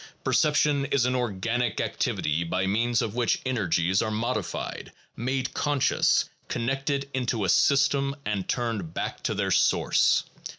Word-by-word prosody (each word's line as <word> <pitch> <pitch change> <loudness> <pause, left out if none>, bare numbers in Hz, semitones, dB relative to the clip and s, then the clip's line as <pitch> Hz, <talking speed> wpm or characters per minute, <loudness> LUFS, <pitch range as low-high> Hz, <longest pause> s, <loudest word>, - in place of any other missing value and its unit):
Perception 150 -2 +2
is 140 -3 +1
an 125 - +1
organic 120 0 -1
activity 75 +3 -1
by 90 +3 -1
means 115 +4 +1
of 105 - -3
which 120 -1 +1
energies 95 -6 +1
are 110 - -1
modified, 110 -1 -3 0.2
made 130 +2 -2
conscious, 145 -3 +2 0.2
connected 135 +3 -2
into 120 -5 -1
a - - -1
system, 140 +3 +3
and 105 -3 -2
turned 110 -9 -2
back - - -4
to - - -2
their - - -1
source. - - +3
120 Hz, 135 wpm, -26 LUFS, 105-135 Hz, 0.2 s, system